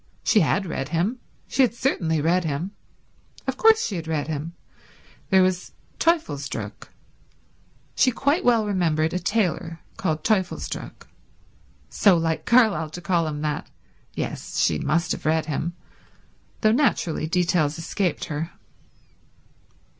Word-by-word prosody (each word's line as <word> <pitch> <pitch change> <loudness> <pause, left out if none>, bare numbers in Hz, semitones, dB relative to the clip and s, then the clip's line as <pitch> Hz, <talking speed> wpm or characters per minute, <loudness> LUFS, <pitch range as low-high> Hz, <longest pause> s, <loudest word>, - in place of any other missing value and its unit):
She 215 - +4
had 195 +3 +2
read 140 -5 -4
him; 180 +10 0 0.3
she 270 - +1
had 250 -2 +3
certainly 165 - 0
read 175 +4 +2
him. 160 +4 -2 0.7
Of - - -1
course 445 -1 +5
she 195 - -3
had 165 -1 -6
read 155 -3 -1
him. 160 +1 -4 0.8
There 190 -2 +5
was 185 -1 -1 0.3
Teufelsdröck—she 255 - -3
quite 285 +9 +1
well 230 -3 +4
remembered 165 -5 +1
a 180 - 0
tailor 175 -4 -1 0.2
called 155 -1 -1
Teufelsdröck. 195 -5 -2 0.9
So 195 -4 +5
like 165 -1 -1
Carlyle 220 -10 +4
to 155 - -7
call 170 -3 +1
him 150 -1 -4
that. 150 -1 -2 0.5
Yes, - - -4
she 75 -2 +2
must 170 - 0
have - - -3
read 160 0 +2
him, 160 +3 -2 0.9
though 215 - +4
naturally 220 - +1
details 165 -3 +1
escaped 175 +1 -2
her. 155 +1 -3
170 Hz, 130 wpm, -24 LUFS, 155-210 Hz, 0.9 s, course